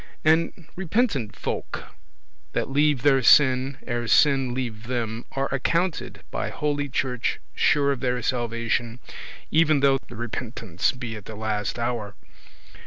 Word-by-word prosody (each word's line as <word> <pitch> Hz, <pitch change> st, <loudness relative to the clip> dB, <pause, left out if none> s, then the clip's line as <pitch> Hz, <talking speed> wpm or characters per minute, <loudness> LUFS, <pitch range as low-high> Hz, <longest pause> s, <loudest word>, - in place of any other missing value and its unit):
And 165 Hz, +1 st, +2 dB
repentant 180 Hz, -, 0 dB
folk -, -, -4 dB, 0.7 s
that -, -, -1 dB
leave 145 Hz, -2 st, +2 dB
their 135 Hz, -2 st, +5 dB
sin 130 Hz, 0 st, +5 dB
ere 120 Hz, -1 st, -2 dB
sin 135 Hz, +1 st, +4 dB
leave 120 Hz, -3 st, -4 dB
them, 115 Hz, -2 st, -3 dB
are 135 Hz, 0 st, 0 dB
accounted 170 Hz, +6 st, -1 dB
by -, -, -2 dB
Holy 145 Hz, -1 st, -2 dB
Church 125 Hz, -2 st, -1 dB
sure 140 Hz, -1 st, +3 dB
of 135 Hz, -, -2 dB
their 125 Hz, 0 st, 0 dB
salvation, 115 Hz, -1 st, -1 dB, 0.5 s
even 155 Hz, -2 st, +4 dB
though 135 Hz, -1 st, +4 dB
the 120 Hz, -, -9 dB
repentance 115 Hz, -5 st, -2 dB
be 120 Hz, -4 st, -6 dB
at 105 Hz, -, -9 dB
the 110 Hz, -, -8 dB
last 105 Hz, -1 st, -2 dB
hour. 115 Hz, -4 st, -3 dB
125 Hz, 135 wpm, -25 LUFS, 115-145 Hz, 0.7 s, their